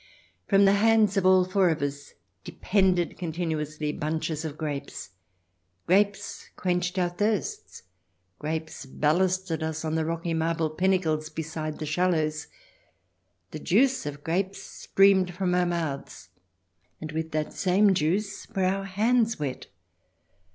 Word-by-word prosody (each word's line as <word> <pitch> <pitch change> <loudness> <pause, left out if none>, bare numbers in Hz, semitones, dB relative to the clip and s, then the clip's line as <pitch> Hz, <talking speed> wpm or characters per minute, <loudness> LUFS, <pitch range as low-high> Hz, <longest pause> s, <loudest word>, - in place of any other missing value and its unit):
From 200 0 +5
the 195 - +5
hands 215 0 +4
of 190 -2 +2
all 185 -1 +5
four 185 -1 +2
of 160 -1 0
us 145 0 -5 0.3
depended 185 -3 0
continuously 155 -3 -3
bunches 155 +1 -3
of 155 -2 -5
grapes; 145 - -5 0.7
grapes 200 +2 0
quenched 180 0 -1
our 180 -1 +2
thirsts; 205 +4 -2 0.6
grapes 160 -2 -4
ballasted 175 +4 0
us 160 0 -3
on 155 - -2
the 160 0 +1
rocky 165 +1 -2
marble 165 -1 0
pinnacles 160 -3 0
beside 155 -1 -5
the 155 - -5
shallows; 155 -2 0 1.0
the 155 - -6
juice 245 - +2
of 145 0 -7
grapes 190 +4 -1
streamed 190 -2 +2
from 185 -1 0
our 180 0 +2
mouths, 155 - -4 0.7
and 155 -1 -6
with 160 +1 -3
that 155 -1 -2
same 195 +2 +3
juice 190 +5 -1
were 190 -1 +2
our 195 +1 0
hands 225 +4 +1
wet. 140 -4 -4
170 Hz, 130 wpm, -26 LUFS, 155-190 Hz, 1.0 s, From